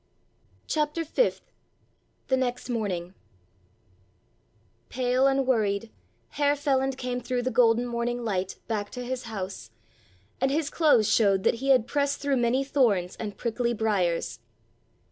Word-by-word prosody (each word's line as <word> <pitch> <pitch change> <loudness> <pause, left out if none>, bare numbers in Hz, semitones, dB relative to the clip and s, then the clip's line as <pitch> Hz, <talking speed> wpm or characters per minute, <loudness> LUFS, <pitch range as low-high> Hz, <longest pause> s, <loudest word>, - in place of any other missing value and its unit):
*CHAPTER 305 +2 -1
FIFTH* 485 +11 0 0.8
*THE 260 - +4
NEXT 250 -1 -2
MORNING* 185 -6 -3 1.8
Pale 255 +1 +2
and 270 0 +2
worried, 220 -3 0 0.4
Herr 290 0 +1
Feland 270 -2 0
came 250 -1 -3
through 245 0 -2
the 255 - -1
golden 235 0 +4
morning 240 0 -2
light 190 -3 -2
back 210 -3 -2
to 250 -1 -5
his 255 0 -4
house, 195 - -6 0.7
and 265 - +2
his 295 +2 -1
clothes 290 -10 +4
showed 195 -4 +3
that - - +3
he 270 - -1
had 255 -4 +5
pressed 285 +1 0
through 280 -1 0
many 245 +3 +2
thorns 220 -11 +1
and 210 -2 -6
prickly 235 0 -1
briers. 185 - 0
245 Hz, 135 wpm, -27 LUFS, 220-270 Hz, 1.8 s, had